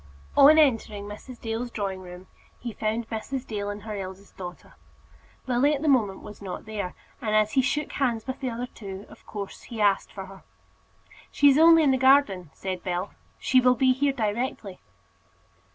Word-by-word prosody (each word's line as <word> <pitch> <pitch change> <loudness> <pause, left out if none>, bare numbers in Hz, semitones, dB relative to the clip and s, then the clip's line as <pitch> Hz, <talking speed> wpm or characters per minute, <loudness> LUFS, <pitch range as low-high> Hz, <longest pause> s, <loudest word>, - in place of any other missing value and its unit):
On 295 +3 +8
entering 225 -8 +2
Mrs. 210 +4 -10
Dale's 230 +2 -3
drawing 195 -4 -4
room 180 0 -10 0.3
he 235 -2 -6
found 220 +2 -2
Mrs. 250 +4 -4
Dale 205 -2 -4
and 205 0 -6
her 215 -1 -5
eldest 190 0 -8
daughter. 180 -1 -9 0.7
Lily 265 +4 +2
at 285 - -5
the - - 0
moment 220 -9 +2
was 210 - -11
not 190 -2 -6
there, 210 -4 -5 0.3
and 215 -3 0
as 215 0 +3
he 265 - +3
shook 280 +2 -1
hands 240 -5 -1
with 260 -1 -5
the 260 - -2
other 240 +1 -4
two, 200 -4 -9
of - - -16
course, 200 -2 -7
he 230 -3 -6
asked 200 -2 +2
for 195 -1 -7
her. 195 0 -13 0.9
"She 285 - +5
is 275 - +3
only 330 0 +7
in 280 - +4
the 260 - +2
garden," 260 - +4
said 185 -2 -4
Bell. 180 +2 -3 0.3
"She 255 0 +3
will 250 0 +4
be 260 0 +4
here 280 +2 +1
directly." 220 -4 -3
220 Hz, 185 wpm, -26 LUFS, 200-260 Hz, 0.9 s, On